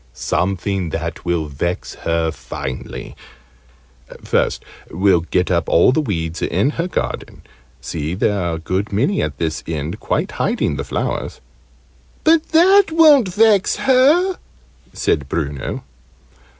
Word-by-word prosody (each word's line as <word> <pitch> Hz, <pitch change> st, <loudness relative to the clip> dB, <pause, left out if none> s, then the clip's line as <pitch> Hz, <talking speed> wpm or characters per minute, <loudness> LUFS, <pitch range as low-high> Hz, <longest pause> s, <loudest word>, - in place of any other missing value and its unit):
"Something 95 Hz, -1 st, -1 dB
that 80 Hz, +3 st, -5 dB
will 85 Hz, -2 st, 0 dB
vex 75 Hz, +5 st, -4 dB
her 85 Hz, -1 st, -1 dB
finely. 65 Hz, -1 st, -7 dB, 1.1 s
First, -, -, 0 dB, 0.2 s
we'll 95 Hz, -1 st, +2 dB
get 90 Hz, +2 st, -1 dB
up 85 Hz, -1 st, 0 dB
all 85 Hz, -, +5 dB
the 155 Hz, -, +1 dB
weeds 85 Hz, -, -3 dB
in 100 Hz, +11 st, +1 dB
her 165 Hz, +3 st, -2 dB
garden. -, -, -4 dB, 0.4 s
See, 75 Hz, +6 st, -4 dB
there 100 Hz, +1 st, 0 dB
are 85 Hz, -2 st, -1 dB
a -, -, -5 dB
good 95 Hz, +6 st, -3 dB
many 135 Hz, -, +1 dB
at -, -, -3 dB
this 80 Hz, -2 st, -2 dB
end 80 Hz, +5 st, -4 dB
quite 175 Hz, +7 st, -1 dB
hiding 230 Hz, +4 st, -1 dB
the -, -, -3 dB
flowers." -, -, -3 dB, 0.8 s
"But 320 Hz, 0 st, +4 dB
that 375 Hz, +5 st, +6 dB
won't 300 Hz, -, +5 dB
vex 210 Hz, 0 st, +3 dB
her!" 295 Hz, +9 st, +3 dB, 0.5 s
said 70 Hz, -2 st, -1 dB
Bruno. 70 Hz, -5 st, -3 dB
95 Hz, 130 wpm, -19 LUFS, -, 1.1 s, that